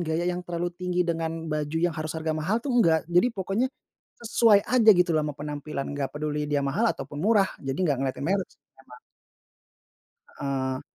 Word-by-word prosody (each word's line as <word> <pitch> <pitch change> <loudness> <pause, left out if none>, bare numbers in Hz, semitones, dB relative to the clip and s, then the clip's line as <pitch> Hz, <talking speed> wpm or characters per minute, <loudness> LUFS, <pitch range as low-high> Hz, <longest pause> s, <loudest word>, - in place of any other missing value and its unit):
gaya 165 0 -1
yang 180 - -4
terlalu 175 0 -3
tinggi 180 0 0
dengan 165 -1 -2
baju 155 -1 -2
yang 170 +1 +1
harus 155 0 -4
harga 160 0 -1
mahal 155 +8 0
tuh 275 - -1
enggak 170 -10 +4
jadi 175 +8 +3
pokoknya, 195 +6 0 0.5
sesuai 225 -3 +4
aja 235 -3 +5
gitu 180 -1 +3
loh 155 - +3
ama 145 - -5
penampilan 145 -1 -5
gak 140 -1 -2
peduli 150 0 -2
dia 145 -1 0
mahal 205 +12 +1
ataupun 145 -6 -5
murah 205 -1 +3
jadi 135 -1 -3
gak 145 -4 +2
ngelihatin 135 0 -2
merek 190 +2 0
sih - - -27 0.2
emang. 125 -2 -15 1.4
Heeh. 130 -1 -2
160 Hz, 180 wpm, -26 LUFS, 145-180 Hz, 1.4 s, aja